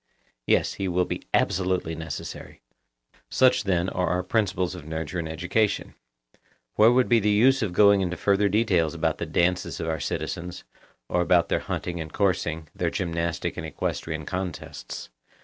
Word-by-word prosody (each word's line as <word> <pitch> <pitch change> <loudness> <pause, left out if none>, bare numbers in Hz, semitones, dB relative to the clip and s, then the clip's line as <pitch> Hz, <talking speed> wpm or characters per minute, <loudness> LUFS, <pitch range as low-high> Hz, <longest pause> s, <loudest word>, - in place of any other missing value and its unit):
Yes, - - +3
he 95 - -3
will 90 0 +1
be - - -5
absolutely 90 -3 +1
necessary. 80 -1 -7 0.7
Such, 130 -5 +3
then, 90 -2 +1
are 90 -1 -1
our 90 +2 0
principles 95 -3 0
of 90 -4 -8
nurture 80 +2 -4
and 80 -1 -4
education: 90 +6 0 0.8
Where 110 +2 +6
would 125 0 +3
be 120 -1 +5
the 105 0 +1
use 125 +6 +4
of 105 -5 -1
going 100 +2 +5
into 90 -1 -2
further 100 0 +2
details 90 -6 +2
about 80 -1 0
the 85 - -3
dances 90 +3 0
of 80 - -3
our 80 -1 -1
citizens, 90 +1 -4 0.4
or 90 - +1
about 90 -1 +3
their - - +2
hunting 85 -1 -4
and 80 -1 -7
coursing, 85 -5 0
their - - -1
gymnastic 85 -1 -2
and - - -4
equestrian 80 -2 -3
contests? 90 0 -5
90 Hz, 165 wpm, -26 LUFS, 85-100 Hz, 0.8 s, Where